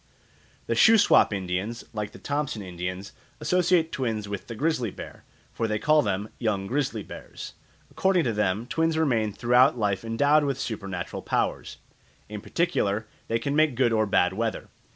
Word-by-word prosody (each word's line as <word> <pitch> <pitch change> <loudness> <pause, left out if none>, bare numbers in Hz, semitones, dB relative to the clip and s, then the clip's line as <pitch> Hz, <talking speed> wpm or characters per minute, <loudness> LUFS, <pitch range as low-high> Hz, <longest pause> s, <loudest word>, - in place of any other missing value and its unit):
The - - -1
Shuswap 220 - +5
Indians, 100 +4 -3
like 105 -2 -4
the - - -12
Thompson 145 -7 -3
Indians, 90 +2 -6 0.3
associate 180 -2 +2
twins 110 -5 -2
with 100 -2 -6
the 115 - -6
grizzly 135 -3 0
bear, - - -10 0.3
for 115 - -1
they 105 0 -1
call 155 +7 +4
them 105 -4 -2
"young 105 -4 -1
grizzly 125 -2 -2
bears." - - -9 0.4
According 190 -3 +2
to 115 - 0
them, 105 +1 0
twins 160 +4 0
remain 120 -9 +1
throughout 125 +6 +3
life 105 -3 0
endowed 145 +7 +3
with 140 -2 -1
supernatural 100 -5 -5
powers. - - -2 0.5
In 105 -1 -6
particular 110 - 0 0.2
they 115 - +1
can 140 +4 -2
make 155 -4 +3
good 120 -2 +2
or 110 -1 +2
bad 90 -2 +2
weather. 115 +2 -3
115 Hz, 160 wpm, -26 LUFS, 105-145 Hz, 0.5 s, Shuswap